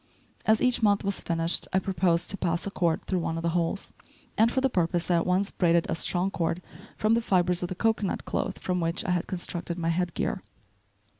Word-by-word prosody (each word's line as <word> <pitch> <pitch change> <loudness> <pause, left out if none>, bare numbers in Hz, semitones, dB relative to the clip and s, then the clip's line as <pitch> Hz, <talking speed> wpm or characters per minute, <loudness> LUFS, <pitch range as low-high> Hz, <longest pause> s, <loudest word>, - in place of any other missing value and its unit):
As 220 0 +4
each 250 -2 +2
month 205 -2 +3
was 200 0 -1
finished 165 0 0
I - - +2
proposed 180 -2 +1
to - - -3
pass 170 -1 -1
a 200 - -3
cord 170 -4 0
through 185 - 0
one 165 -1 -2
of 165 - -4
the 170 - +1
holes; 175 +3 -1 0.4
and 225 +2 +4
for 260 - +1
the 270 - +3
purpose 175 -5 0
I 175 - +4
at 170 - 0
once 190 +2 +1
braided 170 -2 +2
a - - -1
strong 180 +3 0
cord 170 -1 -1 0.4
from 215 +1 +2
the 230 - +3
fibres 180 -4 +2
of 175 - -2
the 185 - -4
cocoanut 220 -1 0
cloth - - -2
from 180 -1 -2
which 165 0 -1
I 180 - 0
had 180 -1 0
constructed 175 -1 -4
my 165 -1 -1
head 175 0 -1
gear. - - -1
180 Hz, 225 wpm, -27 LUFS, 170-195 Hz, 0.4 s, As